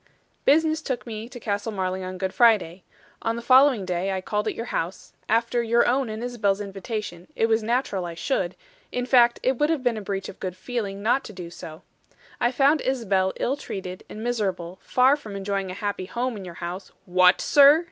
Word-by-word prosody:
"Business 315 +2 +3
took 260 -5 -3
me 225 0 -6
to 245 - -9
Castle 205 0 -2
Marling 190 -2 -2
on 185 0 -5
Good 190 0 -3
Friday. 195 -7 +3 0.4
On 225 0 -1
the 235 - -5
following 255 -4 +5
day 180 +1 -1
I 190 - -1
called 210 +2 -2
at - - -1
your 230 - -4
house; 175 +3 -4 0.2
after 230 +2 +2
your 235 +1 +3
own 255 0 +1
and 220 +2 -5
Isabel's 215 -5 0
invitation, 195 -2 -5
it - - +2
was 225 0 +2
natural 225 -4 -1
I 170 - -7
should; 185 -4 -1 0.4
in 250 0 -2
fact, 240 -2 +5
it 260 -1 +1
would 295 - +3
have 315 -5 0
been 245 -3 +1
a - - -4
breach 195 -1 -4
of - - -10
good 185 -1 -5
feeling 200 -4 -4
not 245 +5 +2
to 215 - -9
do 175 -3 -8
so, 160 0 -10 0.6
I 240 - +2
found 280 +4 +3
Isabel 200 -8 +1
ill 265 - 0
treated 185 -9 -7
and 215 - -7
miserable; 190 -7 -2
far 255 +3 +4
from 220 -9 -9
enjoying 195 -1 -2
a 185 - -6
happy 200 -2 -3
home 245 +3 -2
in 195 -3 -7
your 175 -2 -9
house 180 +3 -6
" - - -41
"What, 180 0 +7
sir?" 285 +2 +7
215 Hz, 210 wpm, -25 LUFS, 190-245 Hz, 0.6 s, What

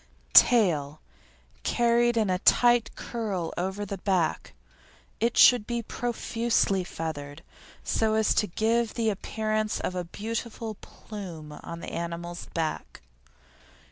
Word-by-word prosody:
TAIL 155 - +5 0.6
Carried 235 - +2
in 215 -4 +2
a 180 - 0
tight 240 +1 +4
curl 205 -8 -4
over 190 +3 -3
the 200 -1 -6
back. 185 -4 0 0.7
It 230 +2 0
should 245 -4 +7
be 235 -1 -2
profusely 230 -4 0
feathered 160 -2 -6 0.4
so 220 -1 +1
as 220 -1 +3
to 210 - +1
give 225 +4 0
the 225 -2 +1
appearance 215 +1 -2
of - - -3
a 180 -1 -2
beautiful 225 +4 -5
"plume" 180 -7 -10
on 170 +3 -8
the - - -7
animal's 170 +1 -5
back. 160 - -4
210 Hz, 120 wpm, -27 LUFS, 175-230 Hz, 0.7 s, should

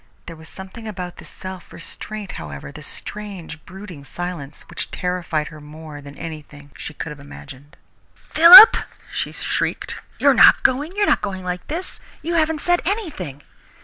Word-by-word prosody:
There 165 - -9
was 160 0 -11
something 190 +4 -10
about 180 -4 -7
this - - -12
self 185 -1 -9
restraint, 210 +4 -7
however, 70 -1 -8
this - - -8
strange, 195 -7 -7
brooding 185 -5 -11
silence, 160 -1 -7
which - - -7
terrified 175 -4 -2
her 155 -1 -12
more 150 0 -11
than 140 0 -12
anything 150 -3 -10
she 160 - -8
could 155 - -6
have 150 - -10
imagined. 145 +1 -13 0.4
"Philip!" 360 +7 +10 0.4
she - - -2
shrieked. - - -2 0.2
"You're - - +4
not - - +6
going? 285 +6 +1
You're 410 0 +2
not - - +2
going 190 -2 -4
like 180 0 -5
this? 345 +5 -4 0.2
You 340 - -2
haven't 320 -2 +1
said 350 0 +2
anything!" 310 - -4
180 Hz, 160 wpm, -21 LUFS, 150-220 Hz, 0.4 s, Philip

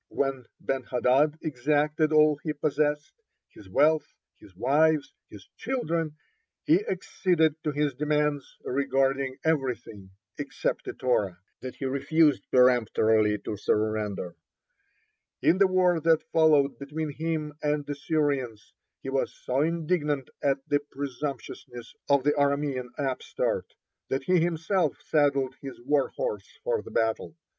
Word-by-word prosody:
When 135 -3 -2
Ben 135 -1 -2
hadad 135 +5 +2
exacted 150 +2 +1
all 155 -1 +5
he 155 - -2
possessed 150 0 -1 0.4
his 95 - -15
wealth, 150 +10 +2 0.2
his 95 - -17
wives, 145 - +2 0.2
his 100 -2 -13
children 165 - -2 0.5
he 175 +6 +3
acceded 175 -4 +1
to 150 - 0
his 145 -1 0
demands 150 0 -1
regarding 135 0 0
everything 125 -10 -2 0.3
except 140 -2 -2
the - - -5
Torah; 105 -8 0 0.2
that 130 0 -7
he 135 - -5
refused 145 +3 +2
peremptorily 110 -4 +4
to 105 - -3
surrender. 105 -4 -1 1.1
(34) - - +5
In 180 - 0
the 195 - +6
war 180 -2 +3
that 160 0 +3
followed 150 -4 +4
between 150 +2 -4
himself 155 -1 -3
and 150 -1 0
the 145 - -3
Syrians, 140 -7 -2 0.3
he 135 - -4
was 135 - 0
so 130 +2 +1
indignant 155 -4 -1
at 135 -1 0
the 145 - +2
presumptuousness 135 -3 -6 0.2
of 140 -2 +4
the 145 - +3
Aramean 140 -3 0
upstart 135 -3 -2 0.4
that 135 0 -1
he 180 +4 +3
himself 165 0 0
saddled 140 -4 +2
his 135 -2 -8
warhorse 150 - -2
for 485 -2 0
the - - -11
battle. 115 +8 -1
145 Hz, 130 wpm, -27 LUFS, 130-155 Hz, 1.1 s, the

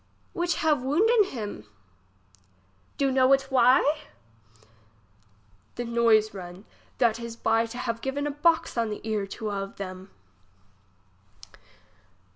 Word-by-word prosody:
Which 345 0 -1
have 300 -4 +1
wounden 410 - +3
him? 210 - -7 1.3
Do 275 -1 +1
know 260 0 +4
it 270 0 +3
why? 265 +4 +4 1.8
The 240 - -4
noise 230 -2 +3
run 185 +1 -9 0.3
that 235 -3 +2
is 235 -1 -7
by 225 0 +1
to 230 - -9
have 230 -2 -3
given 280 +2 -3
a 295 - -1
box 305 -3 +1
on 230 -1 0
the 210 +1 -7
ear 210 -2 -1
to 215 +1 -5
a 200 -1 -2
of 195 0 -7
them. 185 0 -8
235 Hz, 125 wpm, -26 LUFS, 215-275 Hz, 1.8 s, know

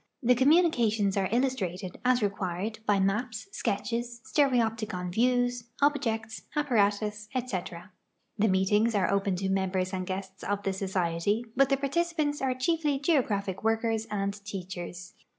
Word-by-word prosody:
The 245 +1 +5
communications 245 - +3
are 195 -2 +1
illustrated, 200 -8 -1
as 250 -2 +3
required, 200 +1 -2
by 205 -1 +3
maps, 215 - -1
sketches, 235 - -2
stereopticon 225 - +1
vieAVS, 245 +1 +1
objects, 230 -6 0
apparatus, 210 -6 +1
etc. 190 -6 -4 0.4
The 220 0 +2
meetings 205 +4 +2
are 195 -1 +2
o] 200 - +4
)en 195 -1 -1
to 190 +1 -2
members 190 -1 0
and 185 -1 -3
guests 190 0 -5
of 205 0 -2
the 195 - 0
Societ}q 190 +3 -1
but 275 +1 +4
the 275 - +3
partici]Aants 300 +1 0
are 260 -1 0
chiefly 295 +2 +1
geographic 225 - +1
Avorkers 225 0 0
and 200 0 -3
teachers. 180 -3 -7
215 Hz, 135 wpm, -29 LUFS, 195-250 Hz, 0.4 s, The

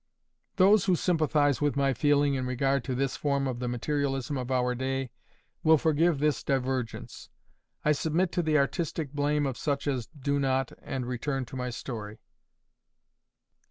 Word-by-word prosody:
Those 195 +1 +5
who 185 -2 +3
sympathize 155 -5 +2
with 145 -1 +1
my 140 -1 +2
feeling 145 0 +3
in 130 -1 -1
regard 135 +1 +1
to 130 - -2
this 135 +1 -1
form 140 -2 0
of 125 -2 -3
the 125 - -2
materialism 135 +2 -1
of 125 -1 -4
our 125 -1 +1
day, 130 0 -2 0.5
will 160 0 +6
forgive 160 +1 +2
this 150 +1 0
divergence. 130 -3 -3 0.6
I 150 - +5
submit 160 +4 +1
to 175 - 0
the 155 -2 +2
artistic 150 0 -1
blame 145 0 +1
of 135 -3 -3
such 140 -2 -1
as 130 -5 -1
do 140 -1 -2
not, 135 -2 0
and 130 -2 -4
return 130 +2 -2
to 130 - -10
my 125 -1 -3
story. 110 -3 -6
140 Hz, 160 wpm, -28 LUFS, 130-150 Hz, 0.6 s, will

